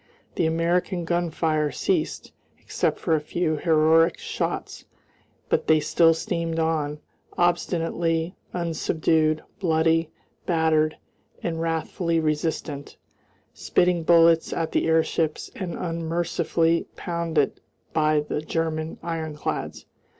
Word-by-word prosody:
The 165 Hz, -, +1 dB
American 170 Hz, +2 st, 0 dB
gunfire 165 Hz, -3 st, 0 dB
ceased, 370 Hz, -4 st, -1 dB, 0.3 s
except -, -, -1 dB
for 165 Hz, -, 0 dB
a 155 Hz, -, +2 dB
few 155 Hz, 0 st, -1 dB
heroic 160 Hz, +1 st, +4 dB
shots, -, -, -4 dB, 0.6 s
but -, -, 0 dB
they 155 Hz, -1 st, +5 dB
still 165 Hz, +2 st, +4 dB
steamed 165 Hz, 0 st, -2 dB
on, 155 Hz, -2 st, 0 dB, 0.4 s
obstinately 170 Hz, -1 st, 0 dB, 0.2 s
unsubdued, 160 Hz, -2 st, +1 dB, 0.2 s
bloody, 165 Hz, -2 st, +2 dB, 0.4 s
battered, 160 Hz, -2 st, +2 dB, 0.5 s
and 165 Hz, -2 st, -2 dB
wrathfully 165 Hz, +1 st, -1 dB
resistant, 155 Hz, -2 st, -2 dB, 0.6 s
spitting 180 Hz, -1 st, +1 dB
bullets 165 Hz, 0 st, +5 dB
at 165 Hz, -1 st, -2 dB
the -, -, +1 dB
airships 160 Hz, -1 st, 0 dB
and 180 Hz, -4 st, -4 dB
unmercifully 165 Hz, 0 st, 0 dB
pounded 170 Hz, -4 st, -1 dB, 0.3 s
by 155 Hz, -1 st, +3 dB
the 150 Hz, 0 st, -3 dB
German 160 Hz, 0 st, -2 dB
ironclads. 160 Hz, -3 st, -4 dB
165 Hz, 100 wpm, -25 LUFS, 155-170 Hz, 0.6 s, they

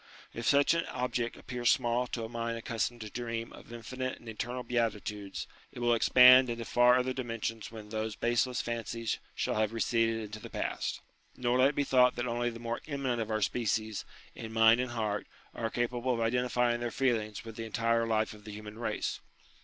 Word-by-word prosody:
If 115 Hz, 0 st, -4 dB
such 140 Hz, +2 st, +5 dB
an 165 Hz, 0 st, +1 dB
object 125 Hz, -2 st, -2 dB
appears 120 Hz, -1 st, -1 dB
small 120 Hz, +1 st, +2 dB
to 120 Hz, -1 st, -4 dB
a -, -, -3 dB
mind 115 Hz, 0 st, -3 dB
accustomed 115 Hz, +1 st, -2 dB
to 105 Hz, -1 st, -7 dB
dream 115 Hz, -1 st, -4 dB
of -, -, -13 dB
infinite 130 Hz, +3 st, -4 dB
and 120 Hz, -, -16 dB
eternal 120 Hz, +3 st, -4 dB
beatitudes, 105 Hz, -4 st, -2 dB, 0.3 s
it -, -, -14 dB
will 120 Hz, 0 st, +2 dB
expand 125 Hz, +2 st, +7 dB
into 115 Hz, 0 st, -3 dB
far 120 Hz, +1 st, +5 dB
other 130 Hz, +1 st, 0 dB
dimensions 115 Hz, -3 st, -4 dB
when 110 Hz, -2 st, -9 dB
those 110 Hz, 0 st, -3 dB
baseless 120 Hz, +1 st, +1 dB
fancies 115 Hz, -1 st, -3 dB, 0.2 s
shall -, -, -1 dB
have 110 Hz, 0 st, +1 dB
receded 115 Hz, 0 st, +1 dB
into 110 Hz, +1 st, -7 dB
the -, -, -9 dB
past. -, -, -3 dB, 0.4 s
Nor 125 Hz, 0 st, +1 dB
let 130 Hz, +2 st, +6 dB
it 140 Hz, -, -5 dB
be 145 Hz, -, +2 dB
thought 125 Hz, -2 st, +4 dB
that 120 Hz, -, -2 dB
only 120 Hz, 0 st, 0 dB
the 115 Hz, -, -8 dB
more 115 Hz, 0 st, -4 dB
eminent 135 Hz, -5 st, -1 dB
of 110 Hz, -, -4 dB
our 110 Hz, -1 st, 0 dB
species, 110 Hz, -2 st, -1 dB, 0.3 s
in 110 Hz, -, -7 dB
mind 115 Hz, +1 st, +5 dB
and 125 Hz, -, -2 dB
heart, 105 Hz, -3 st, -2 dB, 0.3 s
are 115 Hz, -1 st, -2 dB
capable 120 Hz, +2 st, -1 dB
of -, -, -3 dB
identifying 120 Hz, +1 st, +1 dB
their 120 Hz, 0 st, -2 dB
feelings 115 Hz, -4 st, -1 dB
with 115 Hz, -1 st, -8 dB
the 115 Hz, -, -5 dB
entire 115 Hz, 0 st, +1 dB
life 110 Hz, -1 st, +1 dB
of 105 Hz, -1 st, -14 dB
the 105 Hz, -, -8 dB
human 105 Hz, +1 st, -9 dB
race. 120 Hz, -, -2 dB
115 Hz, 200 wpm, -31 LUFS, 110-125 Hz, 0.4 s, expand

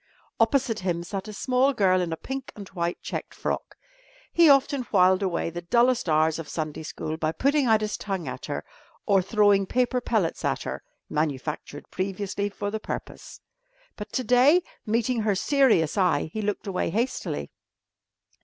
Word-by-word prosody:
Opposite 265 Hz, -5 st, +2 dB
him 175 Hz, -2 st, -2 dB
sat 195 Hz, +3 st, -5 dB
a -, -, -6 dB
small 255 Hz, +5 st, +2 dB
girl 185 Hz, -5 st, +3 dB
in 175 Hz, -2 st, -2 dB
a 165 Hz, -, -3 dB
pink 265 Hz, +5 st, -6 dB
and 200 Hz, -2 st, -9 dB
white 170 Hz, -1 st, -2 dB
checked -, -, -5 dB
frock. -, -, -3 dB, 0.6 s
He 335 Hz, -2 st, +6 dB
often 275 Hz, 0 st, +4 dB
whiled 185 Hz, -1 st, +4 dB
away 175 Hz, -3 st, -1 dB
the 175 Hz, +1 st, -5 dB
dullest 235 Hz, +3 st, +2 dB
hours 155 Hz, +1 st, +2 dB
of 160 Hz, -, -7 dB
Sunday 155 Hz, -1 st, -4 dB
school 155 Hz, 0 st, -5 dB
by 155 Hz, -1 st, 0 dB
putting 280 Hz, -, +1 dB
out 220 Hz, -1 st, +4 dB
his 210 Hz, 0 st, -2 dB
tongue 195 Hz, -4 st, -4 dB
at -, -, -6 dB
her -, -, -4 dB, 0.4 s
or 195 Hz, -3 st, +4 dB
throwing 200 Hz, 0 st, +3 dB
paper 250 Hz, +2 st, +1 dB
pellets 210 Hz, -9 st, -1 dB
at -, -, -1 dB
her -, -, -5 dB, 0.3 s
(manufactured 150 Hz, -1 st, -3 dB
previously 200 Hz, +1 st, -2 dB
for 205 Hz, 0 st, -4 dB
the 220 Hz, -, -3 dB
purpose). -, -, -7 dB, 0.5 s
But 210 Hz, +1 st, -8 dB
to 255 Hz, -, 0 dB
day, 255 Hz, +9 st, +5 dB, 0.2 s
meeting 230 Hz, +2 st, +1 dB
her 210 Hz, -2 st, +1 dB
serious 220 Hz, -, +3 dB
eye, 170 Hz, -4 st, +1 dB
he 220 Hz, -, -2 dB
looked 210 Hz, 0 st, -2 dB
away 195 Hz, -2 st, -1 dB
hastily. 230 Hz, +9 st, -2 dB
205 Hz, 170 wpm, -26 LUFS, 175-245 Hz, 0.6 s, He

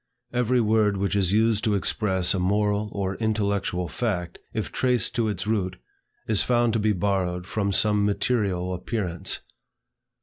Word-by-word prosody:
Every 125 Hz, +1 st, +2 dB
word 110 Hz, -2 st, +2 dB
which 100 Hz, +1 st, -1 dB
is 95 Hz, -3 st, +2 dB
used 110 Hz, 0 st, +2 dB
to 105 Hz, -2 st, +2 dB
express 95 Hz, -2 st, +1 dB
a 95 Hz, -, -1 dB
moral 105 Hz, +2 st, +1 dB
or 100 Hz, -1 st, -3 dB
intellectual 100 Hz, -5 st, -1 dB
fact, 90 Hz, -1 st, -3 dB
if -, -, -3 dB
traced 125 Hz, -4 st, +1 dB
to 115 Hz, -2 st, 0 dB
its 105 Hz, -, -3 dB
root, 100 Hz, -4 st, -1 dB, 0.5 s
is 110 Hz, -3 st, +4 dB
found 120 Hz, -2 st, +2 dB
to 115 Hz, -, +1 dB
be 105 Hz, 0 st, +2 dB
borrowed 90 Hz, -2 st, -1 dB
from 100 Hz, +1 st, -1 dB
some 105 Hz, +1 st, +3 dB
material 100 Hz, -4 st, 0 dB
appearance. 90 Hz, -2 st, -3 dB
105 Hz, 155 wpm, -25 LUFS, 95-110 Hz, 0.5 s, is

